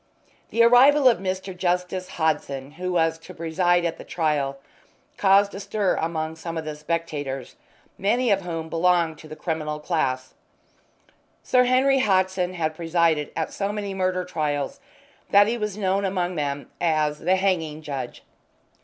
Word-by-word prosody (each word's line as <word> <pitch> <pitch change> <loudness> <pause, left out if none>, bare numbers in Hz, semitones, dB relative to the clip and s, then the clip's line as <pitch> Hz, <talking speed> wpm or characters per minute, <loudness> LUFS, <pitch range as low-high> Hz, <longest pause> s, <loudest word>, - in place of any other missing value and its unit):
The 230 - +3
arrival 260 +4 +6
of 235 -7 +4
Mr. 190 0 -4
Justice 180 +1 -1
Hodson, 145 -4 -1
who 180 +4 -4
was 165 -1 +1
to - - -12
preside 175 +2 +1
at 165 - -2
the - - -8
trial, 145 -4 -1 0.6
caused 200 -1 +4
a 195 - -6
stir 200 -1 0
among 160 -1 -3
some 165 0 -5
of 160 - -4
the 155 -1 -4
spectators, 150 -4 -4 0.4
many 230 +4 +2
of 195 -1 +3
whom 165 -3 -4
belonged 165 -1 +1
to 155 - -12
the 155 - -8
criminal 155 -2 -3
class. 130 -5 -1 1.1
Sir 250 -1 +4
Henry 265 +2 +3
Hodson 185 -4 +1
had 160 -2 -1
presided 165 -2 +1
at 160 - -3
so 200 0 -2
many 205 -2 -4
murder 185 -1 -1
trials 150 - -2 0.5
that 200 0 +7
he 225 +3 0
was 210 -3 -3
known 195 -1 0
among 185 -2 -1
them 145 -3 -3
as 155 -3 +1
"the 180 +4 +2
Hanging 165 -5 -1
Judge." 135 -5 -6
175 Hz, 155 wpm, -24 LUFS, 155-195 Hz, 1.1 s, that